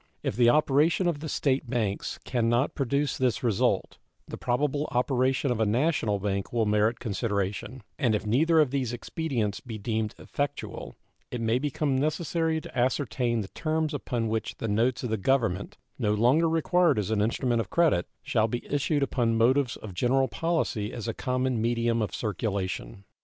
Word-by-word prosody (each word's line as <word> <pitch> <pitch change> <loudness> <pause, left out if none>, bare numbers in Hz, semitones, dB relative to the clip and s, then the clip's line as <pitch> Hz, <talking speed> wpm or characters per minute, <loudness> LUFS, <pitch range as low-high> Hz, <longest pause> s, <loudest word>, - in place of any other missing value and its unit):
If - - -1
the 120 0 +5
operation 150 +5 +3
of 165 -4 0
the 155 +1 -5
State 135 -3 0
banks 110 -5 -2
can 120 -2 0
not 120 +4 +1
produce 140 +1 -1
this 130 -2 +1
result, 115 -6 +1 0.3
the - - -6
probable 145 +4 0
operation 130 +2 +1
of 120 - -1
a 110 - +3
national 115 -2 +1
bank 100 -1 -2
will 115 -2 +1
merit 105 +2 +2
consideration; 105 +2 -3 0.2
and 115 -4 +2
if 105 - -3
neither 160 +9 +3
of 150 -5 +3
these 130 -4 -1
expedients 120 - -2
be 115 0 -7
deemed 110 0 -2
effectual 140 - -4 0.3
it 125 - -4
may 115 +2 +1
become 145 0 -1
necessary 160 +3 0
to - - -11
ascertain 125 -2 0
the 95 - -7
terms 155 -1 -1
upon 120 -5 -2
which 110 0 -2
the 115 - -3
notes 115 +4 +1
of 120 - -2
the 110 - +1
Government 105 -4 0 0.2
(no 105 -3 +1
longer 130 +10 +3
required 165 -1 +3
as 105 0 -1
an 105 -2 +2
instrument 120 +2 +1
of 100 - -7
credit) 160 - +2 0.2
shall 110 0 +1
be 120 +2 -4
issued 145 0 0
upon 120 -4 +1
motives 125 +3 +3
of 105 -4 -9
general 130 +7 +2
policy 130 -8 -1
as 115 -1 -6
a 115 - -1
common 130 -1 -1
medium 115 0 +1
of 105 -4 -1
circulation. 100 - -3
120 Hz, 175 wpm, -27 LUFS, 110-140 Hz, 0.3 s, the